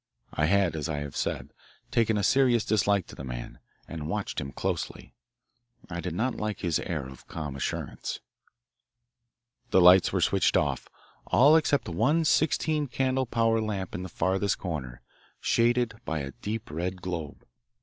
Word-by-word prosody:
I 75 Hz, -, +1 dB
had, 95 Hz, -3 st, +2 dB
as 80 Hz, 0 st, -3 dB
I 75 Hz, -, -2 dB
have 70 Hz, -1 st, -5 dB
said, -, -, -3 dB, 0.4 s
taken 110 Hz, -2 st, +2 dB
a 100 Hz, -, 0 dB
serious 120 Hz, -1 st, +3 dB
dislike 100 Hz, -4 st, +2 dB
to -, -, -12 dB
the -, -, -8 dB
man, -, -, -7 dB, 0.3 s
and 80 Hz, -2 st, -6 dB
watched -, -, -2 dB
him 70 Hz, +1 st, -5 dB
closely. -, -, -4 dB, 0.8 s
I 85 Hz, +1 st, -3 dB
did 90 Hz, -2 st, -4 dB
not 120 Hz, +6 st, 0 dB
like 105 Hz, -2 st, -4 dB
his 85 Hz, -4 st, +1 dB
air 75 Hz, -6 st, -3 dB
of 65 Hz, -1 st, -13 dB
calm 75 Hz, -4 st, -5 dB
assurance. 70 Hz, -, -4 dB, 1.5 s
The -, -, +4 dB
lights 90 Hz, 0 st, +7 dB
were -, -, 0 dB
switched -, -, +3 dB
off, -, -, -1 dB, 0.4 s
all 145 Hz, +5 st, +6 dB
except 145 Hz, -3 st, +2 dB
one 130 Hz, -, +2 dB
sixteen 155 Hz, -1 st, +2 dB
candle 130 Hz, +1 st, 0 dB
power 115 Hz, -1 st, +2 dB
lamp 100 Hz, -4 st, -3 dB
in 90 Hz, -, -4 dB
the 95 Hz, -, -6 dB
farthest 95 Hz, +4 st, 0 dB
corner, 65 Hz, -9 st, -5 dB, 0.4 s
shaded 120 Hz, 0 st, +2 dB
by 80 Hz, -2 st, -2 dB
a 70 Hz, 0 st, -5 dB
deep 105 Hz, +4 st, -5 dB
red 90 Hz, +4 st, -3 dB
globe. 85 Hz, -5 st, -5 dB
95 Hz, 160 wpm, -28 LUFS, 80-115 Hz, 1.5 s, lights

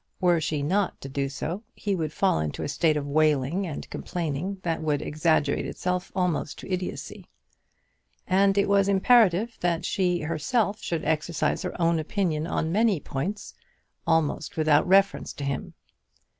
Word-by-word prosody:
Were 175 Hz, -2 st, +3 dB
she 150 Hz, -2 st, -1 dB
not 190 Hz, +6 st, 0 dB
to 135 Hz, -, -7 dB
do 140 Hz, 0 st, -2 dB
so, 165 Hz, +7 st, -4 dB
he 205 Hz, -, -2 dB
would 160 Hz, -5 st, -2 dB
fall 190 Hz, -, +1 dB
into 75 Hz, -1 st, -3 dB
a -, -, -2 dB
state 155 Hz, +2 st, +1 dB
of 145 Hz, -, -3 dB
wailing 155 Hz, +4 st, +1 dB
and 155 Hz, -, -6 dB
complaining 175 Hz, +3 st, -3 dB
that 165 Hz, -2 st, -1 dB
would 150 Hz, -2 st, 0 dB
exaggerate 155 Hz, -2 st, +1 dB
itself 180 Hz, 0 st, -3 dB
almost 180 Hz, -5 st, -1 dB
to 190 Hz, -, -6 dB
idiotcy. 185 Hz, 0 st, -5 dB, 1.0 s
And 195 Hz, +1 st, +3 dB
it 200 Hz, -, +3 dB
was 200 Hz, -1 st, +3 dB
imperative 215 Hz, +1 st, +4 dB
that 170 Hz, -2 st, 0 dB
she 180 Hz, -3 st, 0 dB
herself 200 Hz, -, -1 dB
should 165 Hz, -2 st, -3 dB
exercise 155 Hz, 0 st, 0 dB
her 180 Hz, -1 st, -5 dB
own 165 Hz, -1 st, +2 dB
opinion 160 Hz, -1 st, -1 dB
on 160 Hz, -2 st, -1 dB
many 210 Hz, -2 st, +2 dB
points, 160 Hz, +10 st, -4 dB, 0.5 s
almost 160 Hz, -2 st, 0 dB
without 155 Hz, 0 st, +3 dB
reference 195 Hz, +2 st, +3 dB
to 145 Hz, -, -7 dB
him. 140 Hz, -2 st, -4 dB
170 Hz, 155 wpm, -26 LUFS, 150-190 Hz, 1.0 s, imperative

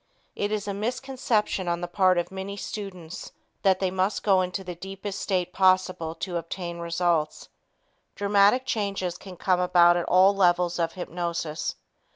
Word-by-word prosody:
It 205 Hz, +1 st, -2 dB
is 210 Hz, -1 st, -2 dB
a 200 Hz, -, -2 dB
misconception 235 Hz, -3 st, -1 dB
on 170 Hz, 0 st, -1 dB
the 175 Hz, -, -3 dB
part 185 Hz, 0 st, +3 dB
of 175 Hz, -, -1 dB
many 190 Hz, +1 st, -6 dB
students 185 Hz, -5 st, -7 dB, 0.3 s
that 190 Hz, -2 st, +3 dB
they 190 Hz, -2 st, 0 dB
must 190 Hz, +2 st, 0 dB
go 195 Hz, -3 st, +4 dB
into 180 Hz, +1 st, -3 dB
the 180 Hz, -1 st, -6 dB
deepest 195 Hz, +3 st, -6 dB
state 180 Hz, -2 st, -1 dB
possible 185 Hz, -3 st, +2 dB
to 180 Hz, -1 st, -3 dB
obtain 170 Hz, +1 st, -5 dB
results. 170 Hz, -2 st, -1 dB, 0.7 s
Dramatic 205 Hz, +5 st, +3 dB
changes 200 Hz, -7 st, -2 dB
can 185 Hz, 0 st, -11 dB
come 185 Hz, 0 st, +1 dB
about 175 Hz, -1 st, +5 dB
at 175 Hz, -, -1 dB
all 185 Hz, +2 st, +5 dB
levels 175 Hz, -2 st, +2 dB
of 165 Hz, -1 st, 0 dB
hypnosis. 170 Hz, -3 st, -3 dB
185 Hz, 160 wpm, -26 LUFS, 175-200 Hz, 0.7 s, about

